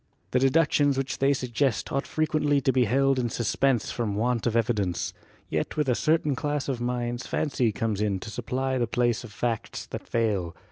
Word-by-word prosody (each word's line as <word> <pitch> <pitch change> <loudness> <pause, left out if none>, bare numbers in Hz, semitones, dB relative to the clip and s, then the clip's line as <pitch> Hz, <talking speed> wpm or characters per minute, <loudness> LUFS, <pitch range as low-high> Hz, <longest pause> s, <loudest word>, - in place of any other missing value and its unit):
The 125 - +3
deductions 145 0 +3
which 135 0 -2
they 135 +1 +4
suggest 130 -2 0
ought 140 - -1
frequently 155 -2 +1
to 130 0 +2
be 125 -2 +3
held 135 +3 +2
in 120 -2 0
suspense 120 +2 +1
from 110 -4 -2
want 120 +2 0
of 115 - 0
evidence. 105 -7 0 0.3
Yet - - -2
with 150 -2 +1
a 125 - +3
certain 155 +1 +1
class 145 +1 -2
of 130 -4 -2
minds 120 0 -2
fancy 135 -6 0
comes 105 0 -2
in 100 -3 0
to 110 - -7
supply 130 +3 -2
the 120 - +1
place 120 0 +1
of 120 - -10
facts 115 +1 -3
that - - -8
fail. 100 -7 0
125 Hz, 190 wpm, -27 LUFS, 115-135 Hz, 0.3 s, they